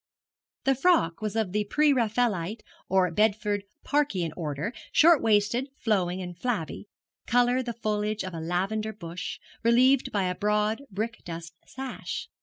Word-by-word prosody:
The 270 - +4
frock 270 - +2
was 215 -1 -3
of 220 -5 0
the 210 +1 0
pre 295 +7 +3
Raffaelite 220 -5 0 0.3
or 185 -2 +3
Bedford 205 +1 +1 0.2
Parkian 200 - 0
order, 155 - -3 0.2
short 330 -1 +6
waisted, 225 +5 +2
flowing, 190 -4 0
and 180 -1 -7
flabby, 205 -2 -3 0.4
colour 245 +1 +3
the 240 -2 -4
foliage 210 0 -1
of 185 -1 -6
a 165 - -4
lavender 195 +6 -1
bush, 175 -2 -6 0.2
relieved 250 +3 +4
by 200 -2 +1
a 180 0 0
broad 210 +4 0
brick 220 +4 -4
dust 165 -1 -7
sash. 265 0 -6
210 Hz, 145 wpm, -27 LUFS, 180-240 Hz, 0.4 s, short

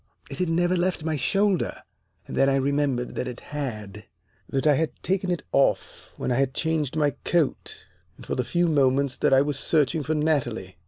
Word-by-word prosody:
It - - -7
had 180 -2 0
never 175 +2 +2
left 180 -2 0
my 160 -1 -1
shoulder. 195 +6 0 0.4
And - - -7
then 135 - +4
I 135 - +2
remembered 135 -2 0
that 125 - -3
it 125 -1 -6
had 105 -8 -5 0.4
that 135 +1 -1
I 150 - +6
had 155 +3 +1
taken 190 0 0
it 175 -4 -1
off 140 - 0
when - - -2
I 120 - +1
had 135 -1 0
changed 160 -3 -1
my 150 -2 +2
coat 170 -5 -1 0.3
and - - -12
for - - -3
the 125 - 0
few 175 +7 +1
moments 140 -3 +2
that - - +2
I 135 0 +6
was 145 -1 -2
searching 155 +1 +1
for 155 +3 -1
Natalie. 120 - -1
145 Hz, 200 wpm, -25 LUFS, 130-160 Hz, 0.4 s, I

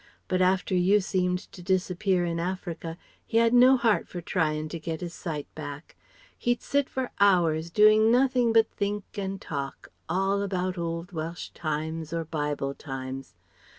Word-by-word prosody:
But 185 0 +1
after 185 +1 +2
you 185 +3 +4
seemed 180 -1 0
to 180 - -11
disappear 185 0 +1
in 170 -1 -2
Africa 170 -2 -4 0.3
he 225 - -1
had 230 0 +4
no 255 +2 +7
heart 230 -3 +2
for 175 - -6
trying 155 -3 -1
to 170 - -5
get 160 0 -4
his 175 -1 -5
sight 150 -5 -4
back. 145 0 -8 0.4
He'd 240 0 -1
sit 285 -1 +1
for 260 -1 -3
hours 170 -5 +3
doing 215 +3 +6
nothing 250 -1 +3
but 225 -1 +4
think 205 0 -2 0.2
and 195 0 -3
talk, 140 -5 -5 0.2
all 195 +3 +1
about 185 -2 -1
old 170 +2 -3
Welsh 165 0 -5
times, 160 0 -3
or 165 -1 -2
Bible 145 -3 -2
times. 135 -1 -7
180 Hz, 160 wpm, -27 LUFS, 160-200 Hz, 0.4 s, no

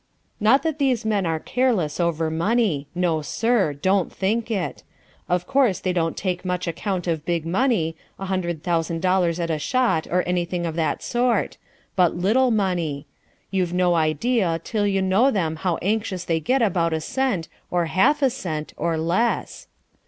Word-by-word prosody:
Not 225 +6 +4
that 320 -2 -2
these 255 -5 +1
men 205 -4 +1
are 160 -1 0
careless 220 -10 0
over 165 -2 0
money. 170 -4 +1
No, 170 -3 +1
sir. 225 - +1
Don't 185 +6 +1
think 220 +4 -1
it. 200 -5 -2 0.5
Of 180 0 +1
course 255 -7 +2
they 185 - -1
don't 165 -2 -1
take 180 -2 -2
much 180 -1 -2
account 180 +2 -2
of 165 -3 -1
big 170 -1 -1
money, 180 -3 +1 0.2
a 195 - -5
hundred 175 -4 -2
thousand 165 -1 -1
dollars 180 -2 +2
at 170 -1 -1
a 155 - -1
shot 230 - +1
or 180 0 +1
anything 175 0 -1
of 165 - -2
that 165 -2 -1
sort. 240 0 0 0.4
But 180 -3 +3
little 220 +9 +3
money. 175 -9 -1 0.5
You've 185 -3 0
no 180 -1 +3
idea 165 - +1
till 210 -2 0
you 195 -1 +1
know 195 +8 +4
them 165 -9 -1
how 175 0 -1
anxious 200 -2 -1
they 165 -2 0
get 255 - +1
about 170 -5 +1
a 160 - 0
cent, 205 - -1 0.2
or 175 -1 +1
half 275 - +2
a 265 - +4
cent, 155 -8 -5
or 165 -1 0
less. 180 +9 -1
180 Hz, 175 wpm, -23 LUFS, 165-220 Hz, 0.5 s, Not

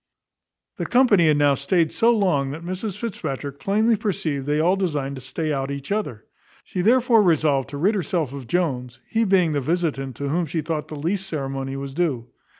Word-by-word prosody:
The - - -3
company 230 -9 +4
had 150 -1 +4
now 145 -1 +4
staid 155 +4 +1
so 230 0 +3
long, 185 -12 +2
that 160 +5 -7
Mrs 185 +2 -4
Fitzpatrick 145 - -5
plainly 220 +3 +2
perceived 160 - -2
they 150 +1 +1
all 175 +4 +3
designed 150 -8 -2
to - - -8
stay 155 +4 -3
out 135 -1 -2
each 140 +4 -6
other. 200 - -2 0.4
She 180 - -3
therefore 235 +2 +4
resolved 155 -7 +2
to 145 - -6
rid 190 +9 +2
herself 170 - -1
of 135 -4 -8
Jones, 125 -7 -1
he 225 0 +1
being 185 -5 +3
the 145 -2 0
visitant 140 -4 -1
to 140 +3 -3
whom 170 +3 0
she 160 +2 -2
thought 155 0 -3
the 155 - -7
least 185 +6 -2
ceremony 135 -4 -4
was 135 0 -6
due. 145 -8 -1
160 Hz, 195 wpm, -23 LUFS, 140-190 Hz, 0.4 s, company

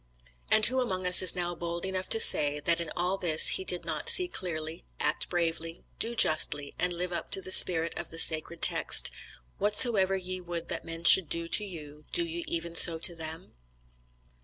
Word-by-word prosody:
And 215 0 +1
who 260 +2 -2
among 185 -7 -6
us 180 0 +6
is 185 - +4
now 175 -1 -5
bold 170 +1 -8
enough 190 -1 -7
to 225 - -2
say, 150 -7 +5
that 170 +3 -2
in 165 - -8
all 180 +3 -4
this 165 -4 +4
he - - -1
did 180 -1 -3
not 155 -3 -3
see 365 - +4
clearly, 160 - -7 0.2
act - - -2
bravely, 165 -1 -5 0.2
do 235 +1 -5
justly, 145 -6 0
and 180 +1 -2
live 175 +1 -6
up 170 - -7
to - - -1
the 185 0 -10
spirit 165 -3 +6
of - - -9
the 165 - -12
sacred 165 +1 0
text: - - +1 0.5
"Whatsoever 205 -2 0
ye 185 0 -8
would 170 -1 -8
that 170 - -7
men 165 0 -9
should 170 -2 +7
do 170 0 -5
to 210 - +2
you, 150 -6 -12
do 170 - -1
ye 170 +1 -8
even 170 0 -6
so 170 0 +4
to 170 +2 -2
them?" 160 +1 -11
170 Hz, 200 wpm, -26 LUFS, 165-185 Hz, 0.5 s, should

